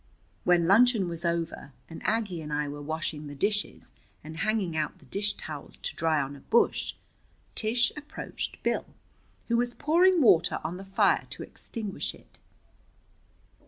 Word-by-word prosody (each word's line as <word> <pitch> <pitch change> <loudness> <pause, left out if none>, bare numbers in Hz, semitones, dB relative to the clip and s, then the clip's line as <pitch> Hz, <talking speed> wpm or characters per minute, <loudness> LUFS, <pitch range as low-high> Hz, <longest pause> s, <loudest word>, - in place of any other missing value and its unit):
When 175 -1 +5
luncheon 220 0 +5
was 170 0 -4
over 170 -4 -2
and 165 - -9
Aggie 210 -6 0
and 150 -1 -7
I 150 0 0
were 145 0 -6
washing 155 0 -3
the 145 - -7
dishes 205 +7 -1 0.3
and 160 +1 -8
hanging 210 -4 0
out 155 -1 -1
the - - -20
dish 205 +1 -1
towels 150 -6 -8
to - - -5
dry 160 -1 +2
on 140 0 -3
a - - -11
bush, 235 - +2 0.6
Tish 240 +3 +2
approached 300 -1 -6
Bill, - - 0 0.6
who 235 - +2
was 240 0 0
pouring 350 +4 +4
water 180 - +5
on 165 +3 -3
the 190 - -8
fire 195 0 +2
to - - -6
extinguish 215 -5 -5
it. - - -21
180 Hz, 160 wpm, -28 LUFS, 155-225 Hz, 0.6 s, When